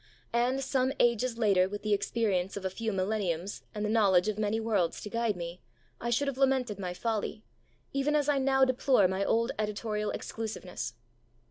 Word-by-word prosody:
And, 250 +3 +1
some 260 0 +1
ages 235 0 +2
later, 195 -5 +3
with 205 +1 -6
the 215 -1 +1
experience 200 -3 0
of 195 - -6
a 190 - -1
few 225 +3 -2
millenniums 195 -2 -1
and 210 0 -2
the - - -1
knowledge 200 -4 +4
of 215 0 -1
many 215 +1 +1
worlds 210 -6 0
to 210 - -7
guide 230 -3 0
me, 170 +1 -6 0.4
I 235 - -3
should 250 +4 +1
have 270 -1 -3
lamented 260 -6 +2
my 180 -2 -4
folly, 220 0 -2 0.5
even 275 +2 +1
as 295 -1 +2
I 290 -2 +3
now 270 0 +4
deplore 255 -5 +3
my 190 +2 -1
old 230 +5 +2
editorial 210 0 -2
exclusiveness. 185 - -5
215 Hz, 185 wpm, -30 LUFS, 195-245 Hz, 0.5 s, knowledge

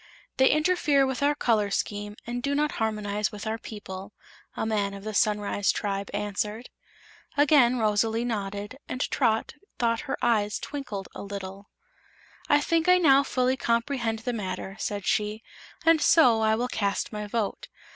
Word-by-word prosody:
"They 265 - +5
interfere 305 -3 +3
with 265 0 -3
our 290 +1 +3
color 220 -7 +1
scheme, 205 +1 -3
and 240 +1 -4
do 280 +2 -1
not 300 +1 +1
harmonize 210 -1 -1
with 210 +1 -8
our 220 +1 -2
people," 205 -3 -8 0.4
a - - -1
man 205 -2 -1
of 195 - -10
the 215 0 -5
Sunrise 205 -1 +1
Tribe 200 -1 -3
answered. 210 +3 -3 0.7
Again 275 -4 +5
Rosalie 220 +1 +1
nodded, 205 +1 -4
and 255 - -4
Trot 220 0 +1 0.2
thought 230 -1 +1
her - - -1
eyes 210 -3 +1
twinkled 250 -10 -6
a - - -7
little. 200 0 -7 0.8
"I 290 0 +5
think 330 +3 +1
I 365 - +7
now 280 -6 +6
fully 255 -2 +1
comprehend 235 -1 -1
the 245 - -1
matter," 195 -2 -4
said 205 -2 -3
she, 210 +1 0 0.4
"and 325 -1 +5
so 245 -9 +5
I 220 0 +3
will 245 +3 -1
cast 200 -5 -1
my 210 0 -4
vote. 215 -1 -2
220 Hz, 160 wpm, -27 LUFS, 205-255 Hz, 0.8 s, I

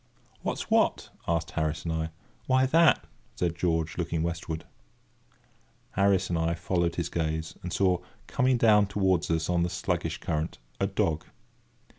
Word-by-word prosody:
"What's - - -3
what?" - - +2 0.2
asked 85 -1 0
Harris 80 -1 -1
and 80 - -1
I. 80 0 -1 0.4
"Why 130 0 +4
that!" 160 +2 +4 0.3
said 85 -2 0
George, 80 -1 0
looking 80 -2 -1
westward. 85 -1 -3
[Picture: - - -23 0.6
The - - -34
dog] - - -38 0.5
Harris 100 -1 +2
and 85 - +1
I 85 +1 +1
followed 85 -1 0
his 85 - -1
gaze, 80 -1 -2
and 90 - -5
saw, 90 0 +2 0.3
coming 130 0 +2
down 105 -3 +5
towards 95 -3 +1
us 80 -1 +1
on 90 -1 +2
the 85 - +1
sluggish 85 -3 -2
current, 80 0 -2 0.2
a - - +2
dog. 80 -1 0
85 Hz, 165 wpm, -28 LUFS, 80-95 Hz, 0.6 s, down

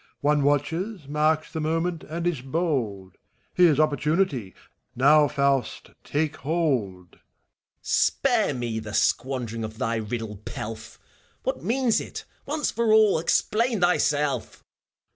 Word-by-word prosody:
One 145 0 +2
watches, 155 +5 -1
marks 155 +2 +1
the 160 - -3
moment, 165 +2 -1
and 170 +2 -5
is 170 -7 -1
bold: 130 - -2 0.3
Here's 170 -5 +4
opportunity 150 - 0 0.4
I^now, 145 +3 +5
Faust, 140 -4 0
take 150 0 -1
hold! 130 - -2
FAUST. - - -4
Spare - - +1
me 120 -3 -3
the 110 -1 -6
squandering 120 -4 0
of 110 0 -6
thy 115 -2 -1
riddle 110 -1 -4
pelf 110 +2 -7
I - - -36 0.4
What - - -3
means 245 -1 +1
it, - - -8 0.2
once 300 +1 -1
for 230 -1 +1
all 215 -5 +5
f - - -5
Explain 230 -2 +1
thyself 145 -7 0
145 Hz, 130 wpm, -25 LUFS, 120-170 Hz, 0.4 s, I^now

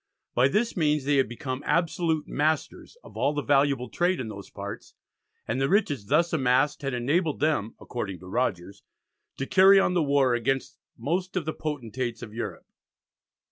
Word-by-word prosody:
By 125 +2 +4
this 215 +10 0
means 150 -4 +1
they 145 0 +3
had 135 -4 +2
become 130 +2 -5
absolute 165 -1 0
masters 155 - -2
of - - -14
all 145 +2 0
the 145 - -1
valuable 140 -3 +2
trade 180 +1 0
in 120 -4 -4
those 100 -2 -9
parts, 100 0 -8 0.5
and 130 - -1
the 135 - +1
riches 155 - +1
thus 170 +7 +2
amassed 135 +1 +2
had 135 -3 -2
enabled 150 +6 0
them, 145 -8 0
according 100 -6 -5
to - - -11
Rogers, 100 -3 -2 0.6
"to 135 - -2
carry 195 +5 +6
on 180 - +2
the 175 - +2
war 140 -4 +3
against 130 +3 -1 0.2
most 175 +10 -2
of 180 -4 -1
the 155 - -2
Potentates 125 -5 -4
of 105 - -9
Europe." 105 -7 -5
140 Hz, 175 wpm, -26 LUFS, 120-160 Hz, 0.6 s, carry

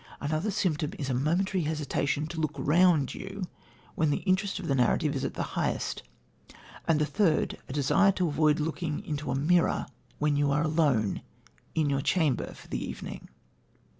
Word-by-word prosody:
Another 155 +7 -1
symptom 160 -7 0
is 140 -2 -3
a - - 0
momentary 170 +7 +1
hesitation 150 -1 -1
to 160 0 -4
look 155 - -1
round 165 -3 +3
you, 195 0 -6 0.5
when 155 -4 +1
the 145 - -1
interest 190 +1 +1
of 190 -4 -5
the 140 - +2
narrative 140 +4 +2
is 135 - -2
at 135 - -3
the - - -1
highest; - - -1 0.9
and 160 -2 +3
the 150 - +3
third, 160 +2 +1
a - - -5
desire 160 +8 +4
to 180 -2 0
avoid 155 0 +2
looking 155 0 -2
into 150 -1 -3
a 125 - 0
mirror, 165 +5 +2 0.3
when 150 -1 +1
you 145 0 +2
are 145 +2 +2
alone, 150 -10 +1 0.5
in 155 -2 +2
your 140 -1 +1
chamber, 155 -1 +1
for - - -14
the - - -3
evening." - - -7
155 Hz, 175 wpm, -29 LUFS, 145-175 Hz, 0.9 s, desire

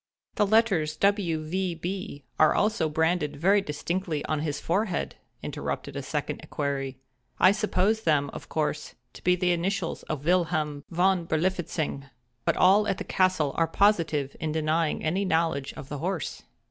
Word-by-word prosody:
"The 210 -2 +2
letters 195 -8 +3
W. 180 -3 +1
V. 180 +2 -2
B. 180 -2 -5 0.2
are 155 - +5
also 210 -6 +1
branded 160 0 0
very 195 +7 +3
distinctly 165 0 -3
on 155 -1 -1
his 150 -1 -2
forehead," 190 +1 -1 0.3
interrupted - - -4
a - - -3
second - - -3
equerry, 135 -2 -3 0.4
"I 185 - +7
supposed 215 +1 +1
them, 145 -5 +2
of - - -9
course, 150 -1 -2 0.2
to - - -13
be 180 0 +4
the 180 0 +1
initials 175 0 -1
of 150 -2 -3
Wilhelm 155 -5 +1
Von 180 0 +2
Berlifitzing—but 145 -8 -2
all 200 +3 +5
at 190 - 0
the 205 - -4
castle 185 -8 +1
are 165 - +3
positive 165 -7 +2
in 155 - -2
denying 155 +1 0
any 180 +6 0
knowledge 160 -6 0
of 135 - -9
the 145 - -5
horse." 175 +1 -3
165 Hz, 155 wpm, -27 LUFS, 150-190 Hz, 0.4 s, I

